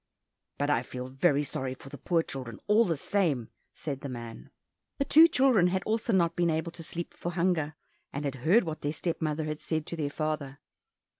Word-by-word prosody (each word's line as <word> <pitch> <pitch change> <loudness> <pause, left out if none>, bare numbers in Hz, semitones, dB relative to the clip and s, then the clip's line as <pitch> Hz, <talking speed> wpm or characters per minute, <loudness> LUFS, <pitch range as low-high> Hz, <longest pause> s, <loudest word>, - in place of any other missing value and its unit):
"But 145 +1 +1
I 120 - +3
feel 125 +1 -6
very 140 +2 +2
sorry 130 -2 -3
for 135 - -12
the 145 - -8
poor 165 +2 +1
children, 125 -7 -6
all 215 +3 +5
the 165 -4 0
same," 150 - 0 0.3
said 140 -3 -5
the 140 - -5
man. 115 -2 -8 0.5
The 275 - 0
two 320 +4 +8
children 255 - +4
had 185 +1 0
also 225 +2 0
not 170 -4 +3
been 175 -1 +2
able 160 +1 -1
to 170 - -9
sleep 170 +1 -5
for 175 - -5
hunger, 170 -4 +1 0.4
and 140 +1 -4
had 140 - -1
heard 185 - +5
what 160 -3 -5
their 145 +1 -1
step 165 +2 -3
mother 155 0 0
had 155 0 -3
said 160 -2 -2
to - - -3
their 150 -3 -2
father. 150 -2 -3
155 Hz, 210 wpm, -29 LUFS, 140-175 Hz, 0.5 s, two